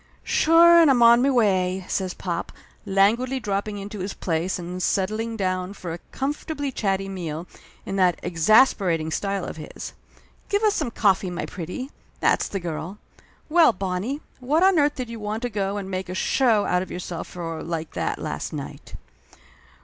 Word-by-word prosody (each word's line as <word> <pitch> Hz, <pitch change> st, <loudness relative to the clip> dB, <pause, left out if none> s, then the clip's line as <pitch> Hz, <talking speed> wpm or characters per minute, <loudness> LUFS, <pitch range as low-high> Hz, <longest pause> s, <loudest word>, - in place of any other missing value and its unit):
"Sure 340 Hz, +1 st, +6 dB
and 320 Hz, -, +6 dB
I'm 245 Hz, -3 st, +5 dB
on 235 Hz, +1 st, +7 dB
me 275 Hz, -, +3 dB
way!" 190 Hz, -7 st, +2 dB
says 185 Hz, -2 st, -2 dB
pop, 170 Hz, -2 st, -4 dB, 0.4 s
languidly 225 Hz, +7 st, +2 dB
dropping 205 Hz, -1 st, -2 dB
into 205 Hz, +1 st, -7 dB
his 190 Hz, +2 st, -4 dB
place 170 Hz, +1 st, -1 dB
and 180 Hz, +1 st, -6 dB
settling 215 Hz, +5 st, -1 dB
down 185 Hz, -1 st, -1 dB
for 175 Hz, -5 st, -6 dB
a 170 Hz, -, -7 dB
com 270 Hz, +2 st, -1 dB
fortably 290 Hz, -3 st, -5 dB
chatty 195 Hz, -3 st, -1 dB
meal, 170 Hz, -4 st, -5 dB, 0.4 s
in 195 Hz, -, -3 dB
that 180 Hz, -3 st, +3 dB
exasperating 170 Hz, -3 st, +3 dB
style 195 Hz, +1 st, -2 dB
of -, -, -7 dB
his. 155 Hz, -, -8 dB, 0.6 s
"Give 405 Hz, +2 st, +1 dB
us 425 Hz, -1 st, +4 dB
some 300 Hz, -10 st, -1 dB
coffee, 195 Hz, -4 st, +2 dB
my 175 Hz, 0 st, -4 dB
pretty! 190 Hz, -, -6 dB, 0.3 s
That's -, -, +2 dB
the 195 Hz, -, -3 dB
girl! 170 Hz, +2 st, -5 dB, 0.5 s
Well, 320 Hz, -5 st, +5 dB
Bonnie, 195 Hz, +9 st, -3 dB, 0.2 s
what 295 Hz, +7 st, +2 dB
on 380 Hz, -3 st, +5 dB
earth 290 Hz, 0 st, +2 dB
did 255 Hz, -3 st, -4 dB
you 230 Hz, -1 st, -7 dB
want 215 Hz, +2 st, -4 dB
to 245 Hz, -, -1 dB
go 200 Hz, -1 st, -1 dB
and 200 Hz, -2 st, -5 dB
make 185 Hz, -1 st, -4 dB
a 185 Hz, -, -4 dB
show 225 Hz, 0 st, +2 dB
out 180 Hz, -, +1 dB
of 185 Hz, -, -6 dB
yourself 175 Hz, -1 st, -5 dB
for 165 Hz, -2 st, -6 dB
like 165 Hz, -1 st, -4 dB
that, -, -, -2 dB
last -, -, -4 dB
night?" -, -, -8 dB
195 Hz, 180 wpm, -24 LUFS, 180-245 Hz, 0.6 s, on